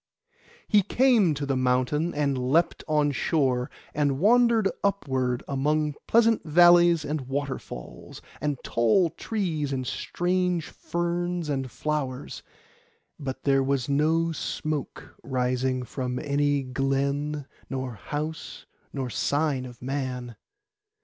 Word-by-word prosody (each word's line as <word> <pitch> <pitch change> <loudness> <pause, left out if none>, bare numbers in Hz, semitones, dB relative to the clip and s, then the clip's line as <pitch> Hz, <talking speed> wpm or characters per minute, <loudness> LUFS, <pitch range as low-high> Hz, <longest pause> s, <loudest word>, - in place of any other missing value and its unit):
He 210 -2 +5
came 215 - +3
to 140 0 -3
the 135 -1 0
mountain, 130 +6 +1
and 145 -2 +1
leapt 130 +7 +1
on 150 -2 +2
shore, 130 -4 0 0.2
and 145 -2 +1
wandered 230 - +4 0.2
upward, 130 -11 0
among 150 +2 0
pleasant 230 -1 +4
valleys 175 0 +6
and 150 0 -2
waterfalls, 135 - -6 0.2
and 145 -1 -1
tall 120 - +2
trees 165 -11 -2
and 130 -1 -2
strange 180 +5 -1
ferns 175 -1 -2
and 135 -2 -2
flowers; 140 -2 -3 0.8
but 135 -2 -5
there 135 -1 +3
was 135 -2 0
no 160 +4 +2
smoke 155 -2 -4
rising 130 0 -1
from 125 +1 -4
any 145 0 +1
glen, 140 +3 -1 0.2
nor 130 -2 -3
house, 150 +3 -5 0.3
nor 130 -3 -4
sign 145 -1 0
of 125 -1 -13
man. 125 -3 -3
145 Hz, 115 wpm, -26 LUFS, 130-165 Hz, 0.8 s, valleys